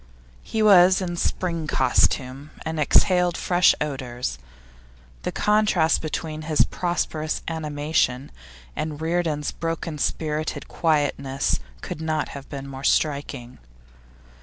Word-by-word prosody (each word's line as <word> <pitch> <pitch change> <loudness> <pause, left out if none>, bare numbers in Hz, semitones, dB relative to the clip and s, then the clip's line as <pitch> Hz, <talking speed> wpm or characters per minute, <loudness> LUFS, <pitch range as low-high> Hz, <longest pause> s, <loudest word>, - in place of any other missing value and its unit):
He 220 -1 -1
was 190 -2 +7
in 175 -2 -3
spring 170 -2 -2
costume, 130 +1 +1 0.2
and 160 0 -3
exhaled 180 +3 +3
fresh 180 0 +4
odours. 125 - -4 0.8
The - - -3
contrast 210 -6 +2
between 155 0 -4
his 155 -1 +2
prosperous 160 -3 -2
animation 150 -4 -1 0.4
and 150 -1 -4
Reardon's 160 -2 -1
broken 165 -2 -4
spirited 155 +1 -2
quietness 145 -4 0 0.2
could 155 - -6
not 155 -1 -1
have 140 -1 -9
been 140 -1 -6
more 135 0 -8
striking. 140 -5 0
155 Hz, 110 wpm, -24 LUFS, 140-170 Hz, 0.8 s, was